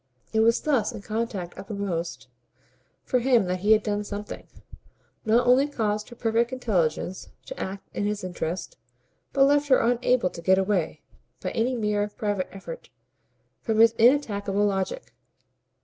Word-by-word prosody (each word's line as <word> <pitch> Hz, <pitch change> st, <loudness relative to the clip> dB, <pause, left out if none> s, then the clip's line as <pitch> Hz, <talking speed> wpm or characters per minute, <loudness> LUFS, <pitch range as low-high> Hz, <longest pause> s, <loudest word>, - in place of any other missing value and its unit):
It 220 Hz, -, +2 dB
was 230 Hz, +1 st, +4 dB
thus 275 Hz, -8 st, +1 dB
in 200 Hz, -, -9 dB
contact 215 Hz, -5 st, -3 dB
uppermost 175 Hz, -, -4 dB, 0.8 s
for 250 Hz, -, +1 dB
him 240 Hz, -4 st, +3 dB
that 180 Hz, 0 st, -2 dB
he 205 Hz, +4 st, +2 dB
had 215 Hz, -1 st, +3 dB
done 210 Hz, -1 st, -1 dB
something; 205 Hz, 0 st, -7 dB, 0.8 s
not 230 Hz, +3 st, +3 dB
only 255 Hz, +3 st, +5 dB
caused 215 Hz, -6 st, -2 dB
her 240 Hz, -, -11 dB
perfect 230 Hz, +1 st, +1 dB
intelligence 190 Hz, -7 st, -1 dB, 0.2 s
to -, -, -8 dB
act 195 Hz, +1 st, -5 dB
in 205 Hz, -, 0 dB
his 210 Hz, -1 st, -3 dB
interest, 180 Hz, -, -4 dB, 0.5 s
but 275 Hz, 0 st, +4 dB
left 290 Hz, +1 st, +3 dB
her 260 Hz, -, +6 dB
unable 240 Hz, -3 st, +2 dB
to -, -, -9 dB
get 190 Hz, +2 st, +4 dB
away, 190 Hz, -3 st, 0 dB, 0.4 s
by -, -, -4 dB
any 245 Hz, +2 st, 0 dB
mere 210 Hz, -2 st, 0 dB
private 205 Hz, -3 st, -2 dB
effort, 195 Hz, -, -9 dB, 0.7 s
from 220 Hz, -2 st, -1 dB
his 225 Hz, 0 st, +6 dB
inattackable 210 Hz, -5 st, +3 dB
logic. 195 Hz, -, -3 dB
210 Hz, 150 wpm, -26 LUFS, 195-240 Hz, 0.8 s, her